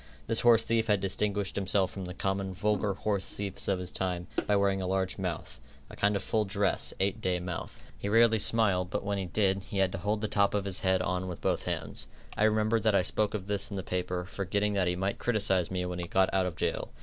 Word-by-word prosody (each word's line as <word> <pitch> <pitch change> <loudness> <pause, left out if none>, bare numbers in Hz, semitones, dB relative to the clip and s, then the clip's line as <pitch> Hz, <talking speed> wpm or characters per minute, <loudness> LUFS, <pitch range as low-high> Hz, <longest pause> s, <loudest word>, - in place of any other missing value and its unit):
This 115 0 +3
horsethief 115 -1 +4
had 105 -2 +3
distinguished 100 +1 -1
himself 95 -1 +1
from 95 -2 -6
the 90 +1 -7
common, 95 -1 -2
vulgar 105 0 0
horsethieves 100 -1 -2
of 100 - +2
his 90 -1 -5
time, 90 -2 -2 0.2
by 105 - +3
wearing 100 -1 +2
a 95 - -2
large 95 0 -1
mouth 90 -4 -4 0.3
a - - -9
kind 100 +1 +2
of 100 - -2
full 110 -1 +1
dress, 100 0 +1
eight 100 +3 0
day 90 -2 0
mouth. 90 -1 -6 0.2
He 100 - -3
rarely 115 0 +5
smiled, 100 -5 +2
but - - -2
when 100 0 -1
he 95 - -2
did, 95 +1 +1
he 100 - -6
had 95 -1 +3
to 95 - -4
hold 105 +3 -1
the 110 - 0
top 100 0 +2
of 100 -1 -1
his 95 -2 -1
head 95 0 +2
on 90 0 -1
with 90 -2 -6
both - - -1
hands. - - -3 0.3
I 110 - +3
remember 110 +1 +2
that 110 -1 +2
I 95 - +4
spoke 105 +2 0
of 95 -3 -4
this 100 0 +1
in 100 - -6
the 95 - -3
paper, 90 -1 -2
forgetting 100 +2 -1
that 95 -3 +1
he 90 - +1
might 95 +2 -2
criticise 95 -7 +1
me 90 -1 -2
when 90 0 -4
he 85 - -4
got 95 +2 +2
out 95 -1 +2
of 85 - -5
jail. - - -2
100 Hz, 240 wpm, -29 LUFS, 95-105 Hz, 0.3 s, rarely